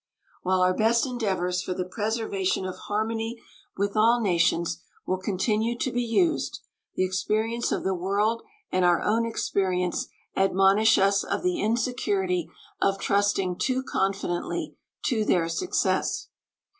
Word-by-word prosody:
While 185 Hz, 0 st, +1 dB
our 185 Hz, 0 st, +4 dB
best 230 Hz, +4 st, +3 dB
endeavors 190 Hz, -8 st, -1 dB
for 185 Hz, -, -3 dB
the 180 Hz, -1 st, -2 dB
preservation 200 Hz, -2 st, -1 dB
of 185 Hz, -, -4 dB
harmony 225 Hz, +2 st, -3 dB, 0.4 s
with 200 Hz, +1 st, -1 dB
all 230 Hz, +3 st, +4 dB
nations 170 Hz, -4 st, +1 dB, 0.2 s
will 185 Hz, 0 st, -1 dB
continue 210 Hz, +5 st, 0 dB
to 260 Hz, -, -1 dB
be 245 Hz, -, 0 dB
used, 315 Hz, +8 st, 0 dB, 0.3 s
the 185 Hz, -, +2 dB
experience 215 Hz, +5 st, -1 dB
of -, -, -1 dB
the 190 Hz, -, +1 dB
world 200 Hz, +5 st, 0 dB, 0.3 s
and 185 Hz, -, +2 dB
our 175 Hz, -1 st, +3 dB
own 230 Hz, +2 st, +2 dB
experience 185 Hz, -5 st, -1 dB, 0.3 s
admonish 195 Hz, +3 st, +4 dB
us 200 Hz, +1 st, +3 dB
of -, -, -2 dB
the 360 Hz, -2 st, 0 dB
insecurity 200 Hz, -7 st, 0 dB, 0.3 s
of 195 Hz, 0 st, +2 dB
trusting 200 Hz, -2 st, +1 dB
too 260 Hz, 0 st, 0 dB
confidently 195 Hz, -6 st, -2 dB, 0.3 s
to 225 Hz, -5 st, +1 dB
their 175 Hz, -5 st, +2 dB
success. 355 Hz, -, 0 dB
200 Hz, 135 wpm, -26 LUFS, 185-230 Hz, 0.4 s, our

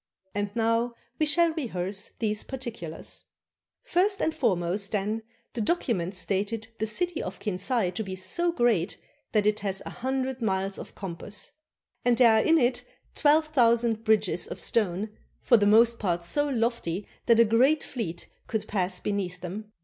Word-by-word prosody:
And 205 Hz, 0 st, -1 dB
now 230 Hz, +1 st, +1 dB, 0.2 s
we 310 Hz, -, +3 dB
shall 335 Hz, +2 st, +4 dB
rehearse 195 Hz, -, -3 dB
these 215 Hz, -2 st, -1 dB
particulars. 235 Hz, -12 st, -5 dB, 0.6 s
First 395 Hz, -4 st, +1 dB
and 320 Hz, -, +1 dB
foremost, 195 Hz, -, 0 dB
then, 210 Hz, +2 st, -1 dB, 0.3 s
the 235 Hz, -, -2 dB
document 210 Hz, -, 0 dB
stated 205 Hz, +4 st, -2 dB
the 220 Hz, -, 0 dB
city 350 Hz, +9 st, 0 dB
of 185 Hz, 0 st, -5 dB
Kinsay 200 Hz, 0 st, 0 dB
to 205 Hz, +5 st, -3 dB
be 190 Hz, -2 st, -5 dB
so 340 Hz, -, 0 dB
great 235 Hz, -, +1 dB, 0.3 s
that 210 Hz, -2 st, +2 dB
it 210 Hz, 0 st, +2 dB
hath 195 Hz, -1 st, -1 dB
an -, -, -6 dB
hundred 260 Hz, 0 st, -2 dB
miles 195 Hz, -2 st, 0 dB
of -, -, -10 dB
compass. 195 Hz, +2 st, -5 dB, 0.5 s
And 245 Hz, -1 st, +3 dB
there 230 Hz, -3 st, +6 dB
are -, -, +2 dB
in 330 Hz, 0 st, +5 dB
it 245 Hz, -3 st, +1 dB, 0.3 s
twelve 310 Hz, +1 st, +3 dB
thousand 235 Hz, -5 st, +3 dB
bridges 210 Hz, -6 st, +1 dB
of -, -, -7 dB
stone, 210 Hz, -1 st, 0 dB, 0.3 s
for 240 Hz, -, +5 dB
the 205 Hz, -1 st, +3 dB
most 230 Hz, +2 st, +5 dB
part 175 Hz, -4 st, 0 dB
so 290 Hz, +12 st, +1 dB
lofty 230 Hz, -7 st, -1 dB, 0.2 s
that 230 Hz, -1 st, +6 dB
a 230 Hz, -, +8 dB
great 255 Hz, +8 st, +3 dB
fleet 185 Hz, -10 st, -5 dB, 0.2 s
could 220 Hz, -2 st, -2 dB
pass 185 Hz, -3 st, -1 dB
beneath 185 Hz, -3 st, -3 dB
them. 205 Hz, +4 st, -6 dB
220 Hz, 165 wpm, -27 LUFS, 195-245 Hz, 0.6 s, a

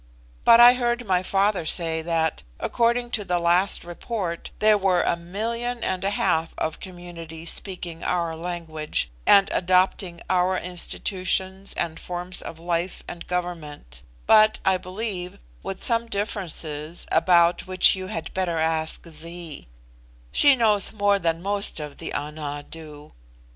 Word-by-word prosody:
But 230 Hz, -, +7 dB
I 240 Hz, +1 st, +10 dB
heard 240 Hz, -1 st, -1 dB
my 185 Hz, -3 st, +2 dB
father 195 Hz, 0 st, +1 dB
say 160 Hz, 0 st, +1 dB
that, 160 Hz, -1 st, -1 dB, 0.2 s
according 240 Hz, +1 st, 0 dB
to 215 Hz, -, 0 dB
the 180 Hz, -2 st, 0 dB
last 175 Hz, +3 st, +2 dB
report, 175 Hz, 0 st, -5 dB
there 215 Hz, 0 st, +5 dB
were 190 Hz, -3 st, +2 dB
a -, -, +1 dB
million 230 Hz, +8 st, -4 dB
and 185 Hz, 0 st, -2 dB
a 195 Hz, -, +1 dB
half 170 Hz, -5 st, 0 dB
of 160 Hz, -, -3 dB
communities 170 Hz, -3 st, -6 dB
speaking 175 Hz, -4 st, -3 dB
our 170 Hz, -2 st, -1 dB
language, 160 Hz, -, -3 dB, 0.2 s
and 195 Hz, -1 st, +7 dB
adopting 185 Hz, 0 st, +1 dB
our 185 Hz, 0 st, +2 dB
institutions 190 Hz, +2 st, -2 dB
and 165 Hz, -1 st, -2 dB
forms 180 Hz, 0 st, -4 dB
of 165 Hz, -, -8 dB
life 170 Hz, +2 st, -3 dB
and 170 Hz, -, -8 dB
government; 155 Hz, -, -5 dB, 0.2 s
but, 215 Hz, 0 st, +6 dB
I 190 Hz, -1 st, +4 dB
believe, 185 Hz, -1 st, -5 dB, 0.2 s
with 195 Hz, -, -6 dB
some 235 Hz, -1 st, +2 dB
differences, 170 Hz, -7 st, -2 dB
about 175 Hz, 0 st, +3 dB
which 185 Hz, 0 st, +5 dB
you 185 Hz, 0 st, -6 dB
had 175 Hz, -5 st, -5 dB
better 180 Hz, -3 st, -1 dB
ask 160 Hz, +1 st, -1 dB
Zee. 165 Hz, -, -8 dB, 0.6 s
She 285 Hz, -2 st, +5 dB
knows 215 Hz, -5 st, +3 dB
more 205 Hz, -1 st, +2 dB
than 165 Hz, -1 st, -1 dB
most 200 Hz, -2 st, 0 dB
of 150 Hz, -2 st, -8 dB
the -, -, -5 dB
Ana 145 Hz, -1 st, -5 dB
do. 150 Hz, -2 st, -11 dB
180 Hz, 145 wpm, -24 LUFS, 165-200 Hz, 0.6 s, I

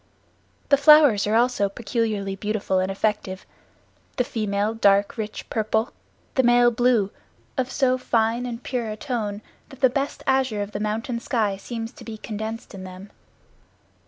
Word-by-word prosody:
The 280 Hz, -, +6 dB
flowers 285 Hz, -8 st, +6 dB
also 230 Hz, -1 st, +2 dB
are -, -, -8 dB
peculiarly 210 Hz, -3 st, -2 dB
beautiful 200 Hz, -1 st, -1 dB
and 185 Hz, +1 st, 0 dB
effective; 195 Hz, -2 st, -2 dB, 0.7 s
the 250 Hz, -, +3 dB
female 215 Hz, -2 st, -1 dB
dark 200 Hz, -2 st, +3 dB
rich 215 Hz, -2 st, -5 dB
purple, 220 Hz, +1 st, 0 dB, 0.4 s
the 260 Hz, -, +3 dB
male 240 Hz, -1 st, +5 dB
blue, 235 Hz, -4 st, +2 dB, 0.4 s
of 260 Hz, -1 st, -1 dB
so 255 Hz, -2 st, +2 dB
fine 235 Hz, 0 st, +1 dB
and 240 Hz, 0 st, -6 dB
pure 240 Hz, -4 st, -2 dB
a 215 Hz, -, -5 dB
tone. 220 Hz, -7 st, -3 dB, 0.3 s
What 270 Hz, -2 st, -14 dB
the 260 Hz, -2 st, +5 dB
best 275 Hz, +2 st, -2 dB
azure 260 Hz, -6 st, +1 dB
of 205 Hz, -, -8 dB
the 205 Hz, -, -4 dB
mountain 225 Hz, +3 st, -2 dB
sky 220 Hz, -5 st, 0 dB
seems 225 Hz, +3 st, -6 dB
to -, -, -14 dB
be 225 Hz, -1 st, -7 dB
condensed 220 Hz, +1 st, -6 dB
in 190 Hz, -1 st, -8 dB
them. 185 Hz, +2 st, -10 dB
225 Hz, 160 wpm, -24 LUFS, 205-245 Hz, 0.7 s, The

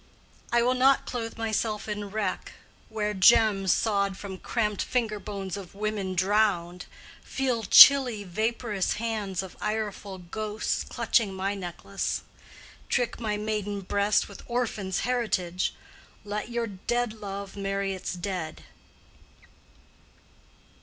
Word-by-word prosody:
I 235 Hz, 0 st, +4 dB
will 250 Hz, +1 st, +3 dB
not 265 Hz, +2 st, +4 dB
clothe 230 Hz, -2 st, -4 dB
myself 220 Hz, -1 st, -1 dB
in 210 Hz, -1 st, -4 dB
wreck—wear 210 Hz, +1 st, -4 dB
gems 195 Hz, -1 st, +5 dB
Sawed 200 Hz, -3 st, +1 dB
from 190 Hz, -2 st, -7 dB
cramped 210 Hz, -3 st, -1 dB
finger 225 Hz, -4 st, -1 dB
bones 195 Hz, -3 st, -5 dB
of 195 Hz, -2 st, -9 dB
women 205 Hz, -2 st, -2 dB
drowned; 185 Hz, -2 st, +1 dB, 0.3 s
Feel 255 Hz, -4 st, -1 dB
chilly 245 Hz, 0 st, +8 dB
vaporous 215 Hz, +1 st, -1 dB
hands 210 Hz, -4 st, -2 dB
of 190 Hz, -, -10 dB
ireful 210 Hz, -2 st, -3 dB
ghosts 210 Hz, +4 st, -3 dB
Clutching 205 Hz, -5 st, +1 dB
my 195 Hz, +1 st, -1 dB
necklace: 195 Hz, +1 st, -4 dB, 0.7 s
trick 245 Hz, -2 st, 0 dB
my 215 Hz, -3 st, -1 dB
maiden 210 Hz, -1 st, -2 dB
breast 200 Hz, +2 st, +1 dB
With 200 Hz, -, -11 dB
orphans' 220 Hz, -6 st, -1 dB
heritage. 190 Hz, -8 st, -1 dB, 0.5 s
Let 210 Hz, +2 st, -4 dB
your 235 Hz, -1 st, -1 dB
dead 230 Hz, +3 st, -2 dB
love 200 Hz, -2 st, -7 dB
Marry 195 Hz, 0 st, -2 dB
its 190 Hz, -, -4 dB
dead. 175 Hz, -3 st, -4 dB
210 Hz, 115 wpm, -27 LUFS, 195-225 Hz, 0.7 s, chilly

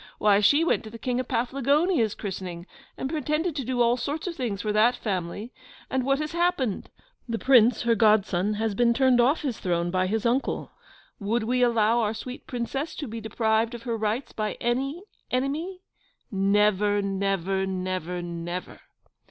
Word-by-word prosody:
Why, 205 Hz, -1 st, +4 dB
she 285 Hz, +10 st, +4 dB
went 340 Hz, -, +1 dB
to -, -, -7 dB
the 230 Hz, -, -9 dB
King 245 Hz, +2 st, -2 dB
of 255 Hz, -, -3 dB
Paflagonia's 275 Hz, -, +1 dB
christening, 180 Hz, -4 st, -6 dB, 0.3 s
and 265 Hz, -, -2 dB
pretended 305 Hz, +2 st, -1 dB
to 275 Hz, -, -2 dB
do 245 Hz, 0 st, +1 dB
all 235 Hz, +1 st, +3 dB
sorts 290 Hz, +5 st, -3 dB
of 355 Hz, -2 st, -3 dB
things 220 Hz, -8 st, -3 dB
for 210 Hz, -1 st, -1 dB
that 220 Hz, +4 st, +4 dB
family; 200 Hz, +3 st, -4 dB, 0.4 s
and 260 Hz, -1 st, +1 dB
what 275 Hz, +1 st, +2 dB
has 305 Hz, +1 st, -3 dB
happened 340 Hz, -, 0 dB, 0.4 s
the 230 Hz, -, -1 dB
Prince, 245 Hz, -2 st, +4 dB
her 235 Hz, -1 st, +3 dB
godson, 210 Hz, -3 st, +3 dB
has 220 Hz, 0 st, -1 dB
been 235 Hz, +3 st, +3 dB
turned 260 Hz, -2 st, +4 dB
off 275 Hz, +7 st, +2 dB
his 260 Hz, -6 st, -2 dB
throne 175 Hz, -1 st, -1 dB
by 185 Hz, 0 st, +1 dB
his 220 Hz, +3 st, -1 dB
uncle. 245 Hz, +4 st, 0 dB, 0.5 s
Would 215 Hz, +3 st, 0 dB
we 250 Hz, +3 st, 0 dB
allow 230 Hz, -1 st, +3 dB
our 220 Hz, -1 st, 0 dB
sweet 250 Hz, +3 st, -8 dB
Princess 270 Hz, +5 st, -3 dB
to 295 Hz, -, -5 dB
be 225 Hz, 0 st, -6 dB
deprived 220 Hz, +1 st, 0 dB
of 235 Hz, -, -9 dB
her 235 Hz, -1 st, -2 dB
rights 220 Hz, +4 st, -2 dB
by 215 Hz, -1 st, -2 dB
any 270 Hz, +8 st, -1 dB, 0.3 s
enemy? 305 Hz, +9 st, -2 dB, 0.5 s
Never, 205 Hz, +1 st, +2 dB
never, 195 Hz, -1 st, -1 dB
never, 185 Hz, -2 st, -3 dB
never! 175 Hz, +1 st, -5 dB
230 Hz, 175 wpm, -26 LUFS, 200-260 Hz, 0.5 s, Why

